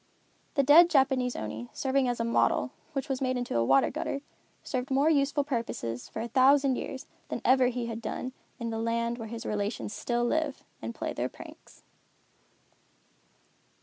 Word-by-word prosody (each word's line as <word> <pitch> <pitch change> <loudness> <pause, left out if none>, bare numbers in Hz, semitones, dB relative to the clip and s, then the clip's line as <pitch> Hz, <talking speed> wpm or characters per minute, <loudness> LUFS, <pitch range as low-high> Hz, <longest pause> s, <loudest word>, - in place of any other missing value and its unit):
The 280 - +4
dead 320 +5 +8
Japanese 265 -5 +2
Oni 110 +3 -5
serving 270 -1 +1
as 245 -1 -1
a - - +1
model, 230 - +2 0.2
which 275 +1 -2
was 270 -2 -2
made 255 -1 0
into 245 - -3
a 115 - +3
water 135 +3 +4
gutter, 275 - -3 0.4
served 255 -1 -3
more 275 +4 +3
useful 285 0 +2
purposes, 230 - -3
for 220 - -4
a - - -3
thousand 270 +2 +4
years, 265 +1 -5 0.2
than - - -3
ever 260 0 +5
he 245 -1 -2
had 230 0 -5
done, 255 +3 -4 0.3
in 230 -1 -3
the 225 - -3
land 235 +1 -1
where 225 - -5
his 230 +1 -7
relations 205 0 -2
still 240 0 -1
live 300 +2 -1 0.2
and 115 +1 -5
play - - -3
their - - -2
pranks. - - -14
250 Hz, 175 wpm, -29 LUFS, 230-275 Hz, 0.4 s, dead